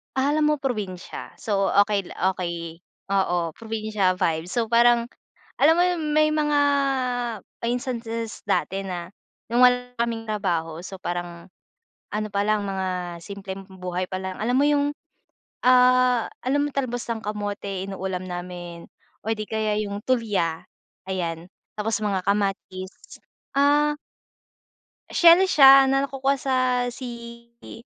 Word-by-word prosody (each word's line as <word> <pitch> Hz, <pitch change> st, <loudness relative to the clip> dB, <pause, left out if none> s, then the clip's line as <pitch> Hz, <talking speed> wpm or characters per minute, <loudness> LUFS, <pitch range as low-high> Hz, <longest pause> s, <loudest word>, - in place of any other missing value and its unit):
Alam 300 Hz, +3 st, +2 dB
mo 300 Hz, -, +3 dB
probinsya. 210 Hz, -9 st, -5 dB
So, 195 Hz, -2 st, 0 dB
okay 200 Hz, 0 st, +3 dB
la 185 Hz, +1 st, -1 dB
okay. 170 Hz, -1 st, -5 dB, 0.3 s
Oo, 175 Hz, -4 st, 0 dB
probinsya 215 Hz, -4 st, -1 dB
vibe. 160 Hz, -1 st, +1 dB
So, 230 Hz, 0 st, 0 dB
parang 235 Hz, +1 st, +4 dB, 0.5 s
alam 310 Hz, +4 st, +6 dB
mo 350 Hz, -, +4 dB
yung 355 Hz, -3 st, 0 dB
may 305 Hz, 0 st, +4 dB
mga 295 Hz, -1 st, +1 dB, 1.1 s
instances 235 Hz, -2 st, -3 dB
dati 195 Hz, -1 st, 0 dB
na 175 Hz, 0 st, -5 dB, 0.4 s
nung 240 Hz, +2 st, +4 dB
wala 250 Hz, 0 st, 0 dB
kaming 230 Hz, -1 st, -1 dB
trabaho, 175 Hz, -7 st, -2 dB
so, 185 Hz, +2 st, -8 dB
parang 175 Hz, -1 st, -5 dB, 0.7 s
ano 215 Hz, 0 st, -1 dB
pa 200 Hz, -, 0 dB
lang 215 Hz, -1 st, +2 dB
mga 185 Hz, -3 st, -3 dB
simpleng 195 Hz, 0 st, -7 dB
buhay 185 Hz, -1 st, -4 dB
pa 185 Hz, -, -4 dB
lang. 190 Hz, 0 st, -5 dB
Alam 240 Hz, +4 st, 0 dB
mo 285 Hz, -, +4 dB
yung, 290 Hz, -1 st, +3 dB, 0.8 s
ah, 250 Hz, -1 st, +5 dB, 0.2 s
alam 285 Hz, +3 st, +1 dB
mo -, -, -2 dB
talbos 245 Hz, -3 st, -2 dB
ng 225 Hz, -1 st, -3 dB
kamote 205 Hz, -2 st, -4 dB
inuulam 190 Hz, -1 st, -4 dB
namin 175 Hz, -1 st, -7 dB, 0.4 s
or 220 Hz, -, 0 dB
di 215 Hz, -1 st, -5 dB
kaya 215 Hz, -1 st, 0 dB
yung 205 Hz, 0 st, -5 dB
tulya, 210 Hz, -10 st, 0 dB, 0.4 s
ayan. 170 Hz, -3 st, -3 dB, 0.3 s
Tapos 220 Hz, +1 st, 0 dB
mga 200 Hz, -3 st, 0 dB
kamatis, 195 Hz, -2 st, -3 dB, 0.4 s
ah 295 Hz, +1 st, +4 dB, 1.2 s
Shell 340 Hz, +1 st, +7 dB
siya 270 Hz, -3 st, +8 dB
na 270 Hz, 0 st, +3 dB
nakukuha 275 Hz, +1 st, 0 dB
sa 265 Hz, 0 st, -2 dB, 0.4 s
sea 235 Hz, -1 st, -9 dB, 0.2 s
i -, -, -10 dB
210 Hz, 135 wpm, -24 LUFS, 185-250 Hz, 1.2 s, siya